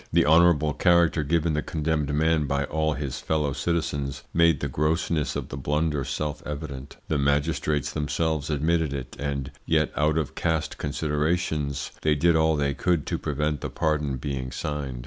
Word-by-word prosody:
The -, -, +4 dB
honourable 80 Hz, -1 st, +5 dB
character 85 Hz, 0 st, +3 dB
given 80 Hz, +2 st, +1 dB
the 75 Hz, -, 0 dB
condemned 75 Hz, -2 st, -1 dB
man 80 Hz, 0 st, +2 dB
by 70 Hz, +1 st, 0 dB
all 80 Hz, +2 st, 0 dB
his 70 Hz, -2 st, -4 dB
fellow 75 Hz, -3 st, 0 dB
citizens 70 Hz, -4 st, -2 dB
made 85 Hz, -3 st, +4 dB
the 70 Hz, -, -2 dB
grossness 75 Hz, +2 st, 0 dB
of -, -, -4 dB
the 65 Hz, -, -6 dB
blunder 75 Hz, +1 st, 0 dB
self 75 Hz, +2 st, -3 dB
evident. 70 Hz, -2 st, -6 dB
The 80 Hz, -, 0 dB
magistrates 75 Hz, +1 st, 0 dB
themselves 80 Hz, 0 st, -1 dB
admitted 80 Hz, 0 st, +1 dB
it, 65 Hz, -3 st, -6 dB
and 70 Hz, -1 st, -3 dB, 0.2 s
yet -, -, +2 dB
out 75 Hz, +1 st, +2 dB
of 80 Hz, -5 st, -1 dB
caste 80 Hz, -2 st, -1 dB
considerations 75 Hz, -1 st, -1 dB
they 75 Hz, -1 st, +3 dB
did 85 Hz, +3 st, +3 dB
all 80 Hz, 0 st, +3 dB
they 70 Hz, -1 st, 0 dB
could 85 Hz, +1 st, 0 dB
to -, -, -2 dB
prevent 75 Hz, -1 st, -1 dB
the -, -, -3 dB
pardon 75 Hz, -4 st, 0 dB
being 65 Hz, -1 st, -4 dB
signed. 70 Hz, -3 st, -4 dB
75 Hz, 165 wpm, -26 LUFS, 70-80 Hz, 0.2 s, honourable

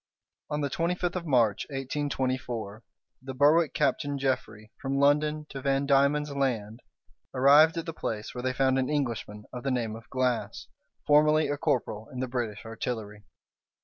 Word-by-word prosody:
On 150 Hz, 0 st, -2 dB
the 140 Hz, -, -1 dB
twenty 170 Hz, +4 st, 0 dB
fifth 180 Hz, 0 st, -2 dB
of 175 Hz, -2 st, -4 dB
March, 115 Hz, -7 st, +2 dB
1824, 130 Hz, -6 st, -3 dB, 0.4 s
the 130 Hz, 0 st, -7 dB
Berwick, 150 Hz, +4 st, +4 dB
Captain 145 Hz, -1 st, 0 dB
Jeffrey, 110 Hz, -5 st, -3 dB
from 135 Hz, 0 st, -1 dB
London 150 Hz, +2 st, +2 dB
to 135 Hz, -, -7 dB
Van 135 Hz, +1 st, +1 dB
Diemen's 140 Hz, +1 st, +3 dB
Land, 120 Hz, -6 st, -2 dB, 0.6 s
arrived 145 Hz, +5 st, +6 dB
at 165 Hz, -, -3 dB
the 165 Hz, -, -5 dB
place, 110 Hz, -8 st, -4 dB
where 125 Hz, -, -5 dB
they 130 Hz, -, 0 dB
found 130 Hz, 0 st, +2 dB
an 130 Hz, -, -1 dB
Englishman 115 Hz, -7 st, -2 dB
of 125 Hz, -, -5 dB
the 135 Hz, -, -2 dB
name 115 Hz, -4 st, -1 dB
of 115 Hz, 0 st, -13 dB
Glass, 130 Hz, -2 st, -1 dB, 0.4 s
formerly 150 Hz, +1 st, +4 dB
a 145 Hz, -, 0 dB
corporal 110 Hz, -5 st, -1 dB
in 130 Hz, -, -7 dB
the 130 Hz, -, -1 dB
British 120 Hz, -4 st, -4 dB
artillery. 110 Hz, -2 st, -5 dB
135 Hz, 165 wpm, -28 LUFS, 115-145 Hz, 0.6 s, arrived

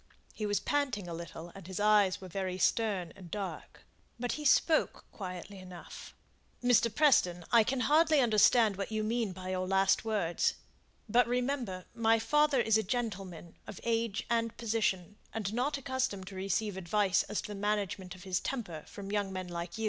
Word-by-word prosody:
He 215 Hz, -, -3 dB
was 205 Hz, 0 st, +1 dB
panting 265 Hz, -10 st, -1 dB
a 170 Hz, -, -5 dB
little, 170 Hz, 0 st, -8 dB
and 195 Hz, -3 st, -11 dB
his 190 Hz, +1 st, -5 dB
eyes 205 Hz, -2 st, +4 dB
were 190 Hz, -, -9 dB
very 185 Hz, 0 st, -3 dB
stern 190 Hz, -4 st, +1 dB
and 185 Hz, -3 st, -12 dB
dark; 200 Hz, +1 st, -6 dB, 0.4 s
but 245 Hz, 0 st, -1 dB
he 300 Hz, -, -4 dB
spoke 315 Hz, +3 st, +3 dB
quietly 190 Hz, 0 st, -7 dB
enough. 180 Hz, -2 st, -11 dB, 0.5 s
"Mr. 245 Hz, -1 st, +4 dB
Preston, 180 Hz, -, +3 dB
I 235 Hz, -2 st, +7 dB
can 250 Hz, +3 st, -1 dB
hardly 310 Hz, +2 st, +4 dB
understand 220 Hz, -3 st, +4 dB
what 200 Hz, +2 st, -4 dB
you 215 Hz, 0 st, -1 dB
mean 225 Hz, -1 st, 0 dB
by 185 Hz, 0 st, -7 dB
your 185 Hz, 0 st, -1 dB
last 195 Hz, 0 st, +3 dB
words. 205 Hz, -7 st, 0 dB, 0.5 s
But, 235 Hz, +2 st, +4 dB
remember, 245 Hz, -7 st, -2 dB
my 225 Hz, -1 st, +3 dB
father 295 Hz, +3 st, +3 dB
is 220 Hz, -2 st, +3 dB
a -, -, +2 dB
gentleman 195 Hz, -7 st, -4 dB
of 195 Hz, -, -8 dB
age 230 Hz, -2 st, -1 dB
and 230 Hz, -1 st, 0 dB
position, 210 Hz, -4 st, -1 dB, 0.2 s
and 210 Hz, -2 st, -2 dB
not 260 Hz, +5 st, 0 dB
accustomed 260 Hz, -7 st, -2 dB
to 195 Hz, -, -10 dB
receive 195 Hz, +1 st, -1 dB
advice 190 Hz, +1 st, +2 dB
as 210 Hz, -, -1 dB
to -, -, -7 dB
the 205 Hz, -1 st, -6 dB
management 200 Hz, -3 st, -2 dB
of 180 Hz, -, -13 dB
his 185 Hz, -2 st, 0 dB
temper 190 Hz, -, -4 dB
from 200 Hz, -1 st, -8 dB
young 205 Hz, -2 st, -1 dB
men 185 Hz, -1 st, -5 dB
like 170 Hz, +1 st, -5 dB
you." -, -, -8 dB
205 Hz, 180 wpm, -31 LUFS, 185-235 Hz, 0.5 s, I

